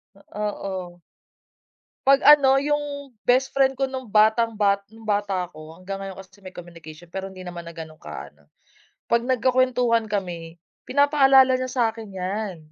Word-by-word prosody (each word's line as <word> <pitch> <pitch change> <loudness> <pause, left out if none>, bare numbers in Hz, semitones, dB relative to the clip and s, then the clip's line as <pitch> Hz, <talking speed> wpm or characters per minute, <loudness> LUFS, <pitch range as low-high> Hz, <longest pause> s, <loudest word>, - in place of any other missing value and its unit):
Ah, 210 +1 -5 0.2
oo. 180 -2 -7 1.1
'Pag 275 +1 +5
ano, 275 -2 +7
'yung 285 -1 -2 0.2
best 265 +2 +3
friend 270 -1 +2
ko 270 - +1
nung 260 -3 -7
batang 220 +1 +3
ba 200 -1 +2
nung 225 0 -16
bata 205 -3 -1
ako 155 0 -13
hanggang 195 +1 -7
ngayon 195 -1 -7
kasi 195 +1 -14
may 185 - -9
communication 170 -1 -12
pero 190 +3 -6
hindi 185 -1 -11
naman 175 -1 -7
na 170 -1 -12
gano'ng 155 -1 -10
kaano, 70 +1 -10 0.6
'pag 235 +1 +2
nagkukuwentuhan 250 -2 +2
kami 175 -5 -4 0.3
pinapaalala 270 -2 +5
niya 255 - -2
sakin 225 -5 -2
'yan. 190 0 -3
210 Hz, 150 wpm, -23 LUFS, 180-255 Hz, 1.1 s, ano